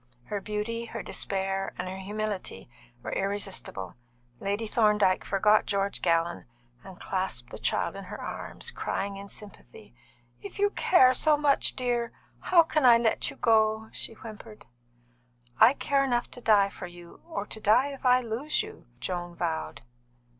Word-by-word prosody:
Her 205 -1 -2
beauty, 215 +3 -3
her - - -6
despair, 195 0 -2
and 180 - -4
her 190 +1 -6
humility 205 - -4 0.4
were - - -4
irresistible. 195 - -2 0.4
Lady 205 +3 -2
Thorndyke 210 -4 +3
forgot 210 +2 +3
George 200 0 -1
Gallon 170 0 +1 0.4
and 190 -2 -12
clasped 185 -11 -3
the - - -8
child - - 0
in - - -7
her - - -8
arms, - - -5
crying 200 0 -3
in 200 0 -9
sympathy. 175 - -10 0.5
"If 200 - -9
you 410 0 +2
care 260 -12 +5
so 300 +3 +3
much, 290 -1 +3
dear, 240 -2 -1 0.3
how 345 -2 +5
can 310 -2 0
I 240 -2 +8
let 230 -1 0
you - - -9
go?" 220 -1 +2
she - - -6
whimpered. 220 0 -11 0.9
"I 230 +4 +8
care 280 -1 +1
enough 245 -3 0
to 245 - -10
die 205 -3 +4
for 185 - -8
you, 175 -1 -14
or 265 -11 -3
to 220 - -5
die 245 +7 +4
if 275 - -11
I 250 0 +5
lose 250 - -1
you!" 435 +1 -12
Joan 175 -1 -4
vowed. 80 - -3
210 Hz, 160 wpm, -28 LUFS, 190-240 Hz, 0.9 s, I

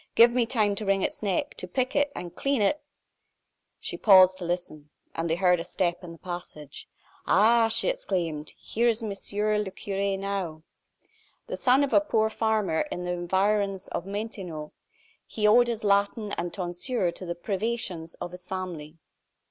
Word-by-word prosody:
Give 235 +1 +8
me 240 -2 +2
time 215 -4 +2
to 215 - -4
wring 195 -1 +2
its - - -3
neck, 195 -4 -1
to 185 - -6
pick 255 +8 -1
it, 285 0 +2
and 175 -1 -7
clean 275 -2 0
it 250 +10 +1 0.5
" - - -51 0.3
She - - -5
paused 185 -2 +7
to 180 - -4
listen, 170 -4 -4 0.2
and 165 +1 -2
they 165 - +2
heard 180 -1 +3
a - - -3
step 175 0 -1
in 175 - -8
the 165 - -11
passage. 170 -5 -8 0.4
"Ah!" 225 +3 +5
she 225 - +1
exclaimed, 175 - -2
"here 235 +2 -1
is 230 0 +2
Monsieur 210 0 -1
le 210 -2 -2
Cure 195 0 -2
now!" 190 -5 -4 0.8
The - - -4
son 260 +2 +3
of 280 - -1
a - - +6
poor 220 -7 +1
farmer 215 -7 +1
in 180 - -4
the 180 - -2
environs 195 +2 0
of 175 - -4
Montaignac, 195 -7 -5 0.6
he 215 - -2
owed 240 +3 +6
his 230 -2 -3
Latin 205 +1 +1
and 175 -3 -3
tonsure 180 +2 -2
to 185 - -9
the 170 -1 -4
privations 190 -3 -3
of 175 - -6
his 180 0 -11
family. 175 -5 -6
195 Hz, 180 wpm, -27 LUFS, 175-220 Hz, 0.8 s, Give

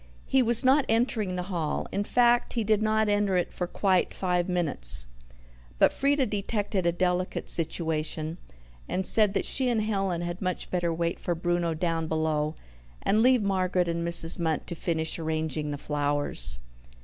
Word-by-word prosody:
He 265 - +2
was 235 +1 +3
not 275 +3 +5
entering 225 -4 0
the 180 - -3
hall 175 -5 -3
in 200 - -1
fact, 240 +2 +2
he 230 - -1
did 215 0 +1
not 220 0 +1
enter 205 -2 +1
it 175 - -2
for 180 - -3
quite 185 0 0
five 180 -1 -1
minutes. 130 - +1 0.7
But - - +4
Frieda 280 0 +1
detected 205 -3 -2
a - - +3
delicate 180 +1 -1
situation, 160 0 0 0.5
and 190 - -2
said 210 -1 +3
that - - 0
she 260 -2 0
and 225 -3 0
Helen 195 -5 -1
had 175 +2 -5
much 185 -1 -3
better 175 -2 0
wait 170 +1 -2
for 175 - -2
Bruno 175 -1 -1
down 165 -1 -2
below, 155 -1 -1 0.5
and 215 +2 +2
leave 250 -2 +4
Margaret 185 -2 0
and 170 0 -2
Mrs. 170 0 +5
Munt 160 -2 -1
to - - -5
finish 165 -1 -2
arranging 155 -1 -2
the 145 - -4
flowers. 145 - +1
180 Hz, 170 wpm, -27 LUFS, 165-210 Hz, 0.7 s, not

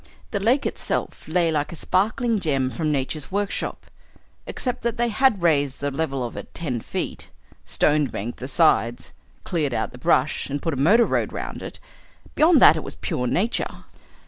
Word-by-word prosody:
The 200 - -1
lake 240 +8 +2
itself - - -3
lay 165 0 +2
like 150 -2 -1
a - - -7
sparkling 215 +7 +1
gem 135 -7 0
from 155 +1 -1
nature's 140 +1 -2
workshop 205 0 -2 0.6
except 250 -2 -3
that 235 -1 -2
they 240 0 +1
had 230 -5 +2
raised 145 -5 +2
the 145 0 -2
level 140 -3 -2
of 120 - -7
it - - -9
ten 135 -8 -3
feet, - - -5 0.4
stone 150 -1 +2
banked 115 +1 -6
the 130 - -5
sides, 130 -5 +2 0.3
cleared 150 -8 -1
out 110 - -1
the 125 - -12
brush, 130 +4 +1
and 145 +1 -2
put 165 +2 -2
a - - -2
motor 210 - +5
road - - 0
round - - -6
it. - - -7 0.5
Beyond 315 -1 +5
that 160 - +8
it 155 - -4
was - - -6
pure 125 0 -2
nature. 210 - 0
155 Hz, 180 wpm, -23 LUFS, 135-205 Hz, 0.6 s, that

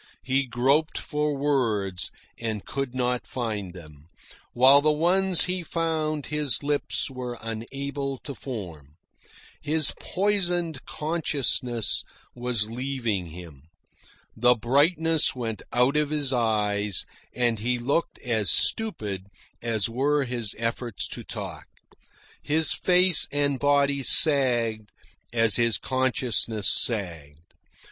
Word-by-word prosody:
He 135 +1 +1
groped 135 +6 +1
for 150 -1 -2
words 115 -10 0 0.3
and 110 -3 -4
could 135 -2 -4
not 125 -1 -1
find 105 -7 -4
them, 75 -3 -13 0.5
while 135 +3 +7
the 155 +1 +3
ones 180 +4 +4
he 185 0 -2
found 160 -3 -2
his 150 -3 0
lips 145 -1 -1
were 125 -2 -6
unable 135 +5 -5
to 140 - -6
form. 85 - -8 0.7
His 155 -1 +1
poisoned 175 -6 -1
consciousness 140 -7 -1 0.3
was 120 -3 -1
leaving 120 -6 -3
him. 80 -3 -12 0.7
The 125 +2 +4
brightness 155 +7 +2
went 115 -3 -4
out 125 +4 +2
of 150 -1 +1
his 145 -3 0
eyes, 105 -4 +1 0.3
and 120 -3 +1
he 120 +3 0
looked 140 +7 -1
as 110 -5 0
stupid 105 - +1 0.3
as 115 -3 0
were 140 +5 +1
his 120 -5 -3
efforts 115 -1 -1
to - - -7
talk. - - -5 0.7
His 155 -1 +2
face 180 -2 +4
and 140 -1 0
body 140 -1 +2
sagged 120 -8 +3 0.4
as 115 -3 +3
his 115 -2 +2
consciousness 125 -5 0
sagged. 85 -8 -1
125 Hz, 115 wpm, -25 LUFS, 110-145 Hz, 0.7 s, while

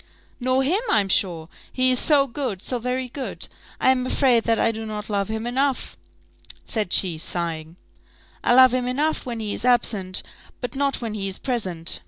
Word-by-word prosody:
"Nor 255 +1 +1
him, 355 +11 +2
I'm 200 -3 +3
sure 170 -5 +1 0.2
he 255 0 +3
is 250 - +3
so 290 -3 +4
good, 240 -7 -4
so 250 - -1
very 250 +2 -2
good! 265 +1 -5 0.3
I 260 - +4
am 255 -1 0
afraid 250 -4 +3
that 230 -1 +2
I 230 - +2
do 225 0 -6
not 215 -1 -6
love 200 -1 0
him 220 +1 -4
enough," 265 +2 -1 0.7
said 215 -6 -1
she, 175 -5 +2
sighing. 165 -1 -3 0.7
"I 245 - +4
love 255 -1 +7
him 250 -1 0
enough 290 +3 -1
when 235 -2 -4
he 215 -2 -3
is - - -4
absent, 215 -7 +1 0.4
but 245 - -5
not 275 -1 0
when 225 -2 -4
he 200 -2 -3
is 195 - -3
present. 185 -10 0
235 Hz, 190 wpm, -23 LUFS, 200-255 Hz, 0.7 s, love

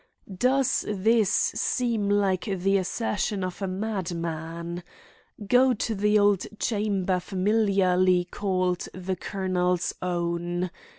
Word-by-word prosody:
Does 265 +5 +2
this 210 +1 +2
seem 230 -2 0
like 200 -2 +1
the 195 -1 +1
assertion 205 0 -2
of 185 +2 -5
a 195 - -1
madman? 170 -4 -4 0.7
Go 250 +2 +4
to 225 +1 -2
the 210 +1 +2
old 205 -2 +3
chamber 200 -4 0
familiarly 185 -2 +2
called 185 -3 -1
"The 185 0 -3
Colonel's 180 -2 -1
Own." 175 0 -2
190 Hz, 105 wpm, -26 LUFS, 180-210 Hz, 0.7 s, Go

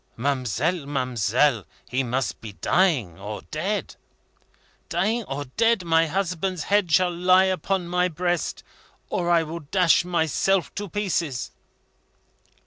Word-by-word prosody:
"Ma'amselle, 140 - -1
ma'amselle, 125 -2 +1 0.2
he 130 +1 0
must 130 +1 -2
be 110 -3 -8
dying 125 - +1
or 105 +1 -6
dead." 190 +7 -2 0.9
"Dying 210 +8 0
or 145 -1 -4
dead, 230 -4 +3
my 165 0 +3
husband's 180 0 -2
head 200 -4 +1
shall 180 +3 +4
lie 185 +2 +5
upon 190 -1 -1
my 180 +1 +1
breast, 175 0 -2 0.5
or 175 -1 -1
I 170 -1 +4
will 165 +2 -6
dash 170 +3 +3
myself 175 +1 +1
to 205 -1 -5
pieces." 170 -9 -2
170 Hz, 125 wpm, -24 LUFS, 135-185 Hz, 0.9 s, lie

